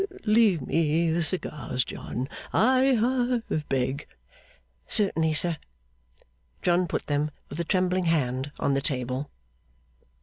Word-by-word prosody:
Leave 215 Hz, -, +4 dB
me 165 Hz, +3 st, +1 dB
the 170 Hz, +2 st, +1 dB
cigars, 150 Hz, -6 st, -2 dB
John, 125 Hz, +2 st, -5 dB, 0.2 s
I 260 Hz, +3 st, +4 dB
ha 245 Hz, +1 st, +1 dB, 0.3 s
beg.' 135 Hz, +2 st, -1 dB, 0.8 s
'Certainly, 165 Hz, -7 st, +2 dB
sir.' 165 Hz, +1 st, +1 dB, 1.1 s
John 175 Hz, 0 st, +3 dB
put -, -, -3 dB
them, 145 Hz, +1 st, 0 dB, 0.2 s
with 145 Hz, -, -6 dB
a -, -, +1 dB
trembling 185 Hz, 0 st, +1 dB
hand, 135 Hz, -4 st, 0 dB
on 140 Hz, -, +1 dB
the 135 Hz, -, +1 dB
table. 130 Hz, 0 st, -2 dB
165 Hz, 115 wpm, -27 LUFS, 140-190 Hz, 1.1 s, Leave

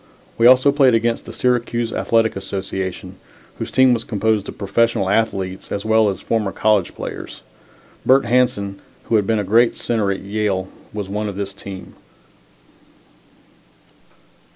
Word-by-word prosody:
We 115 Hz, -, +5 dB
also 130 Hz, +3 st, +6 dB
played 135 Hz, -4 st, +4 dB
against 115 Hz, +1 st, 0 dB
the -, -, -6 dB
Syracuse 120 Hz, -2 st, -1 dB
Athletic 115 Hz, -1 st, +1 dB
Association, 95 Hz, -1 st, -5 dB, 0.4 s
whose -, -, -4 dB
team 130 Hz, -1 st, +4 dB
was 115 Hz, -1 st, -1 dB
composed 110 Hz, -2 st, -1 dB
of -, -, -9 dB
professional 105 Hz, -1 st, +1 dB
athletes 100 Hz, -4 st, -1 dB
as 100 Hz, +1 st, -3 dB
well 110 Hz, -1 st, +3 dB
as 95 Hz, -, -4 dB
former 110 Hz, -4 st, -1 dB
college 105 Hz, -4 st, +1 dB
players. -, -, -7 dB, 0.6 s
Bert 135 Hz, +1 st, +4 dB
Hanson, 115 Hz, -6 st, 0 dB, 0.2 s
who 115 Hz, -, -1 dB
had 105 Hz, -3 st, +2 dB
been 115 Hz, -, +2 dB
a 105 Hz, -, 0 dB
great 115 Hz, +5 st, +3 dB
center 110 Hz, -4 st, -1 dB
at 95 Hz, -, -4 dB
Yale, 100 Hz, -2 st, -2 dB, 0.2 s
was 105 Hz, -2 st, -5 dB
one 105 Hz, +2 st, -3 dB
of 100 Hz, -, -7 dB
this 100 Hz, 0 st, -4 dB
team. 95 Hz, -1 st, -9 dB
105 Hz, 150 wpm, -20 LUFS, 100-115 Hz, 0.6 s, also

